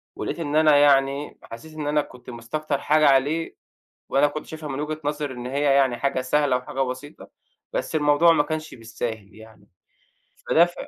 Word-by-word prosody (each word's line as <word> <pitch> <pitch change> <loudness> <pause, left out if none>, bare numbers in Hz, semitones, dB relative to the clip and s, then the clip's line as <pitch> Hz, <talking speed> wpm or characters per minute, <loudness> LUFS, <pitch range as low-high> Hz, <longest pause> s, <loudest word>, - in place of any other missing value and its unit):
ولقيت - - -4
إن 150 -2 -3
أنا 155 -2 +5
يعني 140 0 +2
حسيت 155 +8 -11
إن 150 -1 -5
أنا 150 0 +2
كنت 125 -2 -13
مستكتر 140 +5 -4
حاجة 155 0 +3
عليه، 145 +4 +2 0.5
وأنا 140 +2 +4
كنت 150 +1 -6
شايفها 155 -2 -8
من 135 +1 -4
وجهة 155 +1 -3
نظري 145 -2 -3
إن 125 0 -8
هي 140 +3 -2
يعني 135 -3 +3
حاجة 130 0 -1
سهلة 135 0 +1
و - - -8
حاجة 135 +1 -4
بسيطة، 130 +3 -5 0.4
بس - - -3
الموضوع 150 +3 +4
ما 145 -2 +3
كانش 155 +1 -5
بالساهل 110 -3 -6
يعني، 110 -2 -16 0.8
فده 170 - +5
ف 175 - -8
145 Hz, 180 wpm, -24 LUFS, 130-155 Hz, 0.8 s, أنا